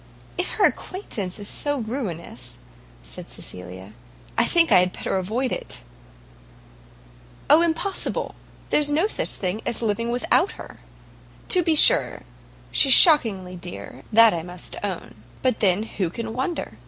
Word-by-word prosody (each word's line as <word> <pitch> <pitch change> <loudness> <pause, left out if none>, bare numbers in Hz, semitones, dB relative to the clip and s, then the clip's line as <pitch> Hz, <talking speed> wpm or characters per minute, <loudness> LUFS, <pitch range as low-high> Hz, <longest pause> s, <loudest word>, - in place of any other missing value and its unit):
"If 355 - -2
her - - +3
acquaintance 210 - -3
is 205 -1 -5
so 290 +5 -1
ruinous," 220 - -6 0.5
said - - -10
Cecilia, 95 +2 -9 0.4
"I - - +3
think 335 -1 +3
I - - +7
had 180 0 +1
better - - -4
avoid 225 +8 -2
it." - - -5 1.7
"Oh, 315 - +7
impossible! 340 +3 -2 0.4
there's 295 -1 +2
no 310 +6 +1
such 435 - +1
thing 190 +3 -3
as 235 - -2
living 225 +2 -1
without 250 +10 +1
her. - - -12 0.7
To 365 - +4
be 325 -2 +1
sure - - +5 0.5
she's 270 - +5
shockingly 220 - +5
dear, 175 0 -9
that 230 0 +6
I 170 - -3
must 175 +1 -9
own; 180 - -6 0.2
but 255 -3 +1
then 195 0 +2
who 195 -5 -3
can 225 +5 -6
wonder? 260 - -4
225 Hz, 140 wpm, -23 LUFS, 180-290 Hz, 1.7 s, I